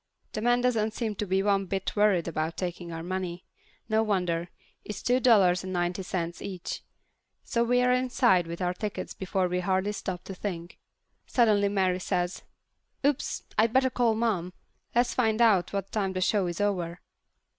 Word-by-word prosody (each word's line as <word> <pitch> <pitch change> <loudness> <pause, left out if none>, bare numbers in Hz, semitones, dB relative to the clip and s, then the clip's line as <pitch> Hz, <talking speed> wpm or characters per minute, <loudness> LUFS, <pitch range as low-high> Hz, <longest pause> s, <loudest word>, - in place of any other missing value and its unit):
The 215 - -3
man 240 +1 +3
doesn't 225 -3 +1
seem 225 -3 -2
to 210 - -2
be 190 +1 +1
one 195 -1 +2
bit 195 +1 -2
worried 205 -5 +3
about 160 0 -2
taking 175 -1 -4
our 165 0 -5
money. 180 -1 -4 0.4
No 220 0 +2
wonder. 180 -5 0 0.3
It's 210 - -7
two 250 +1 +3
dollars 195 -8 +5
and 185 - -5
ninety 175 +1 -1
cents 175 -2 -3
each. 185 -3 -5 0.6
So 235 - 0
we're 245 +1 +3
inside 245 -8 +3
with 170 +2 -4
our 180 0 +1
tickets 210 +2 -5
before 190 -1 -1
we've 180 0 -1
hardly 190 +2 +1
stopped 185 -3 -5
to 195 - -6
think. 175 -3 -6 0.5
Suddenly 210 -4 +3
Mary 190 -2 +1
says, 180 -1 -1 0.6
"Oops! 285 -1 0 0.2
I 220 - +6
better 260 +2 +2
call 235 -3 +2
Mom! 200 -6 -1 0.4
Let's 240 +1 +3
find 220 -3 +1
out 215 -7 +4
what 195 -1 -3
time 195 -3 -1
the 185 - -2
show 195 0 +2
is 175 +1 -4
over." 180 -4 -1
195 Hz, 175 wpm, -28 LUFS, 180-220 Hz, 0.6 s, I